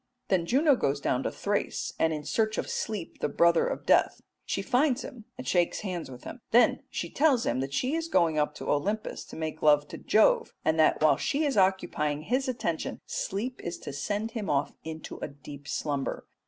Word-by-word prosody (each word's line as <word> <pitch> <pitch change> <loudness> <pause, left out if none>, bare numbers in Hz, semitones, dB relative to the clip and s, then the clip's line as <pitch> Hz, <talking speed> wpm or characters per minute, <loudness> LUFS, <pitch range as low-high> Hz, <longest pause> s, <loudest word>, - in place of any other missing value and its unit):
Then 180 -3 +2
Juno 285 - +4
goes 140 - 0
down 125 -2 0
to - - -2
Thrace, 205 0 -2
and 160 - +3
in 150 -1 -3
search 215 +6 0
of - - -2
Sleep 210 -6 -4
the - - 0
brother 170 +3 +4
of - - -4
Death. - - +3 0.3
She - - -1
finds 270 +1 +2
him 230 -5 -9
and 255 - -7
shakes 175 -2 +1
hands 180 -7 -4
with 125 -1 -11
him. 250 - -8
Then 240 +2 +4
she - - -3
tells 280 -6 +3
him 130 - 0
she 255 - -1
is 330 0 -1
going 165 - +2
up 150 0 0
to - - -7
Olympus 205 +9 -1
to - - -11
make 160 -1 -4
love 150 -1 +4
to - - -8
Jove, 215 - +3
and 160 0 +2
that 155 - +4
while 155 - +5
she 295 +2 0
is 280 - 0
occupying 185 -6 +1
his 255 - 0
attention 170 -10 -2
Sleep 230 +7 -3
is 170 0 -4
to 145 - -8
send 205 +10 -2
him 220 -4 -4
off 145 0 +1
into 160 0 -7
a - - -4
deep 145 0 -11
slumber. 145 -3 -2
175 Hz, 205 wpm, -28 LUFS, 150-235 Hz, 0.3 s, while